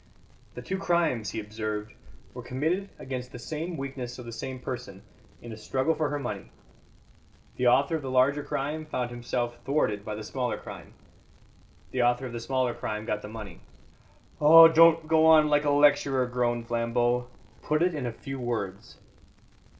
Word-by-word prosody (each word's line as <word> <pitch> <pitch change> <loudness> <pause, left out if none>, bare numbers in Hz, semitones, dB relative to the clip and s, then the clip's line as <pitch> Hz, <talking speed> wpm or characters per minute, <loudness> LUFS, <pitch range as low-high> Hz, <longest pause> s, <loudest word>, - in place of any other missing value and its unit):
"The - - -7
two 190 0 -3
crimes," 165 - +1
he 110 - -4
observed, 105 0 -5 0.4
"were - - -7
committed 165 +10 -2
against 130 -1 -6
the - - -8
same 160 +7 -5
weakness 130 -3 -6
of 125 - -9
the 115 - -7
same 130 +3 -6
person, 105 -7 -7 0.4
in 120 - -8
a 110 - -8
struggle 130 +7 0
for 155 -2 -1
her 145 - -2
money. 115 -8 -5 1.1
The 125 - +2
author 140 +6 +3
of - - -8
the 135 - -5
larger 130 +3 +3
crime 150 +2 -3
found 125 -5 -3
himself 120 0 -3
thwarted 115 -8 0
by 105 0 -5
the 110 - -7
smaller 125 +2 -3
crime; - - -11 1.0
the 125 - 0
author 120 +2 +2
of 125 - -7
the 120 - -4
smaller 130 0 -1
crime 105 -1 -5
got 105 -1 -2
the - - -8
money." 110 - -9 0.8
"Oh, 165 +2 +10
don't 165 0 +5
go 160 0 +4
on 155 -1 +6
like 145 0 +2
a - - +2
lecturer," 145 -2 +3
groaned 120 -1 -1
Flambeau; 120 +1 0 0.3
"put 155 +2 +1
it 180 0 +2
in 140 -5 -3
a - - -2
few 135 +3 -7
words." 105 -6 -4
130 Hz, 175 wpm, -27 LUFS, 120-150 Hz, 1.1 s, Oh